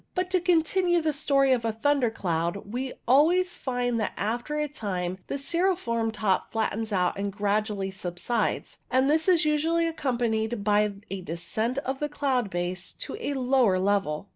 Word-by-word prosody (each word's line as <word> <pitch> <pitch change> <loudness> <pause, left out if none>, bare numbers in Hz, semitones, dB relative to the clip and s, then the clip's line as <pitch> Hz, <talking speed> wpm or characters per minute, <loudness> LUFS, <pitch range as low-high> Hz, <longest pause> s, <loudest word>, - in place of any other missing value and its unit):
But, 365 0 -1
to 370 - +4
continue 350 +1 +3
the 315 -2 0
story 275 -2 +2
of 245 -3 +2
a 225 - 0
thunder 250 +3 +1
cloud, 175 -1 -2
we 255 +1 -3
alwaysi 350 +8 +4
find 245 -3 -1
that 215 - -1
after 240 +8 -2
a 300 0 0
time 185 -9 -3
the - - -3
cirriform 280 -7 0
top 210 -3 0
flattens 220 0 -1
out 185 -1 +1
and 200 0 -2
gradually 205 -1 -1
subsides, 190 +5 -2
and 260 +1 +3
this 315 +4 +2
is 350 -4 +4
usually 320 +3 +2
accompanied 240 -8 -1
by 210 0 +3 0.2
a 195 -1 -4
descent 215 +9 -2
of 265 +1 -2
the 295 - -1
cloud 265 -7 0
base 180 +1 -3
to - - -6
a 290 -11 -2
lower 250 -6 +3
level. 195 -3 0
240 Hz, 165 wpm, -27 LUFS, 200-295 Hz, 0.2 s, to